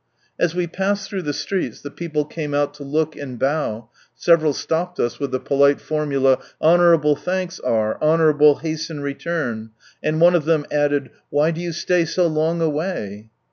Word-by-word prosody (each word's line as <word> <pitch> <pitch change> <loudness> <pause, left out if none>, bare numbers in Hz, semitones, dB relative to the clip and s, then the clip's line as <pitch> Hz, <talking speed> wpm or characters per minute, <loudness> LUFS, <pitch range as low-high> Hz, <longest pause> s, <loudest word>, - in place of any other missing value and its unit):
As 175 -1 +1
we 180 -1 0
passed 195 +4 -2
through 195 -2 -4
the 150 - -2
streets 180 +6 -3
the 145 - -8
people 155 -3 -3
came 150 -1 -4
out 145 0 0
to 145 0 -10
look 155 +2 -1
and 130 -4 -7
bow, 120 -5 -2 0.2
several 160 +3 +3
stopped 170 +5 -3
us 120 - -1
with 140 -1 -2
the 130 - -2
polite 140 +1 +3
formula, 140 -4 +1
'' - - -36
Honourable 165 -3 +4
thanks 180 +3 -3
are, 110 -1 -1
honourably 155 -2 +4
hasten 155 -1 -4
return," 140 -6 -3 0.3
and 155 +1 -1
one 175 +2 +6
of 170 -4 +1
them 155 -2 +2
added 145 -1 0
" - - -46
Why 150 +3 +2
do 165 +1 -5
you 175 -1 -3
stay 170 +1 +1
so 180 +2 +1
long 160 +1 0
away 145 - -3
155 Hz, 180 wpm, -21 LUFS, 145-170 Hz, 0.3 s, one